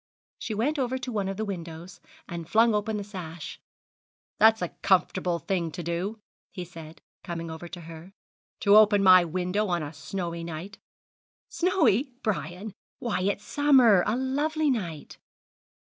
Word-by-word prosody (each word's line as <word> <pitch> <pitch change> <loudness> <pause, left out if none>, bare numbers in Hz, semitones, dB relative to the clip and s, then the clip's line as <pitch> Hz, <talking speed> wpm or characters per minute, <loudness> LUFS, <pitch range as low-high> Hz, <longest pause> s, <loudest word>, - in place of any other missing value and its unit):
She 220 - -4
went 285 +8 0
over 260 0 0
to 255 -1 -5
one 205 -4 -1
of 195 0 -4
the 220 - -2
windows, 170 -1 -7 0.3
and 170 -2 -7
flung 225 +1 +4
open 210 +1 -1
the 205 - -4
sash. 175 -6 -8 0.8
'That's 220 -2 +5
a 175 - -2
comfortable 185 -2 +2
thing 170 -1 -2
to 175 - -5
do,' 175 +6 -3 0.3
he 180 -3 -7
said, 165 -2 -12 0.2
coming 165 -1 -5
over 160 +2 -8
to 175 0 -9
her, 165 +2 -11 0.5
'to 205 0 +6
open 210 -2 +6
my 185 -1 +8
window 180 +5 -1
on 175 -3 -1
a 145 +1 -7
snowy 170 +2 -5
night.' 170 +5 -7 0.7
'Snowy, 310 - +2
Brian! 195 -1 -3 0.2
Why, 235 -7 -2
it's 200 +2 -1
summer 255 -11 +5
a 215 - +1
lovely 290 +4 0
night!' 170 - -5
195 Hz, 155 wpm, -27 LUFS, 170-220 Hz, 0.8 s, my